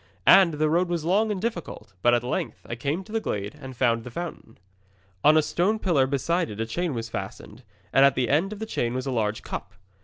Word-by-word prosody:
And 185 -5 +7
the 155 +1 +1
road 170 +3 +2
was 170 -3 -2
long 210 +5 +2
and 200 - -2
difficult; 170 - -5
but 120 +3 +5
at 120 - 0
length 125 - -3
I - - -6
came 140 +10 -2
to 215 - -15
the 225 - 0
glade 100 - -4
and 130 -2 -9
found 115 -2 +2
the 125 - -8
fountain. 160 -5 -7 0.7
On 155 +1 +6
a 155 - +4
stone 190 +8 +1
pillar 160 -11 +2
beside 165 +6 0
it 105 - -8
a 115 - 0
chain 165 +5 -2
was 115 -1 -4
fastened, - - -7 0.3
and 135 - +6
at 140 -1 +5
the 125 -2 +1
end 165 +8 +2
of 215 - -6
the 220 - -4
chain 120 - -2
was 130 +1 -3
a 135 - -2
large 110 -3 -1
cup. - - -6
145 Hz, 240 wpm, -25 LUFS, 120-175 Hz, 0.7 s, And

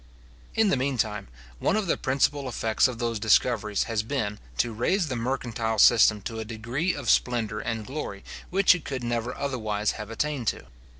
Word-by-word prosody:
In 220 -2 +4
the 140 - +2
mean 130 0 -1
time, 105 - -1 0.3
one - - +1
of 215 -2 0
the 170 - +1
principal 135 0 0
effects 110 0 +2
of 125 -2 -5
those 115 -2 -2
discoveries 110 -1 +2
has 115 -2 -1
been, 110 -3 -3 0.2
to 120 - +1
raise 160 - 0
the 130 - -2
mercantile 115 -2 -2
system 105 -1 +6
to 115 +2 -5
a - - -3
degree 120 +10 -2
of 145 -4 -6
splendour 115 -4 +1
and 110 -1 -3
glory 130 -8 -6 0.3
which 195 +1 +5
it 180 -4 -5
could 130 -3 -4
never 120 +1 -2
otherwise 110 -6 -1
have 105 -1 -7
attained 130 +1 -2
to. - - -1
120 Hz, 185 wpm, -26 LUFS, 110-135 Hz, 0.3 s, system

